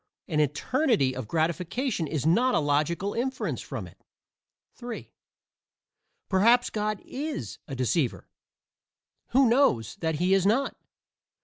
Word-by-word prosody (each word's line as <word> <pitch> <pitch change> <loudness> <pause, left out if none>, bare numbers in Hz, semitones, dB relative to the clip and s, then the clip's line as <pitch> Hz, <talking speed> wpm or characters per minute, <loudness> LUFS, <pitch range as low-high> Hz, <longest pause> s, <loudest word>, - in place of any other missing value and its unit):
An 155 -3 0
eternity 150 - +1
of 130 -4 -5
gratification 170 - -1
is 150 -2 -2
not 235 +11 +3
a - - +4
logical 155 +7 0
inference 260 +2 -2
from - - -6
it. - - -16 0.7
(3) 240 -2 -8 1.2
Perhaps 230 +6 +4
God 210 -1 -1
is 275 - -5
"a 135 - -5
deceiver;" 130 +1 0 1.0
who 265 +1 +4
knows 230 - +2
that 160 -1 -1
he 180 +5 +2
is 195 -2 +4
not? 230 +8 +1
190 Hz, 120 wpm, -27 LUFS, 150-245 Hz, 1.2 s, a